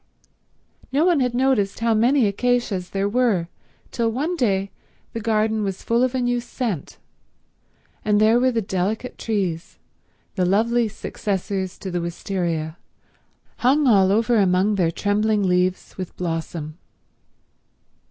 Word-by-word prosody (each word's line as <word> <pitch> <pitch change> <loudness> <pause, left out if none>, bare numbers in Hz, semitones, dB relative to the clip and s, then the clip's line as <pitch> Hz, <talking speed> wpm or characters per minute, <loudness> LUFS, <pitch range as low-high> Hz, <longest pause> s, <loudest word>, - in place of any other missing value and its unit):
No 290 +5 +2
one 350 -4 +3
had 250 -2 0
noticed 250 -6 +1
how 230 0 +2
many 240 +4 +3
acacias 205 -3 0
there 195 0 -1
were 205 -7 +1 0.4
till 230 -1 0
one 300 +10 -1
day 195 - 0 0.4
the 230 - -3
garden 220 0 +1
was 195 -2 -4
full 230 +1 +1
of 255 0 +1
a - - +1
new 245 0 +1
scent, 235 - -4 1.1
and 210 -1 +2
there 220 +3 +5
were 255 +1 +3
the 230 -2 -1
delicate 195 +6 -2
trees, 185 -7 -2 0.6
the 185 - 0
lovely 225 +5 +2
successors 195 -2 -3
to 190 - -6
the 175 0 -1
wistaria, 170 -2 -3 0.8
hung 280 +4 +3
all 195 -6 +5
over 230 +3 +2
among 190 +1 +3
their 180 -5 +2
trembling 205 +4 +1
leaves 180 0 0
with 185 - -6
blossom. 165 -2 -4
210 Hz, 135 wpm, -22 LUFS, 185-240 Hz, 1.1 s, there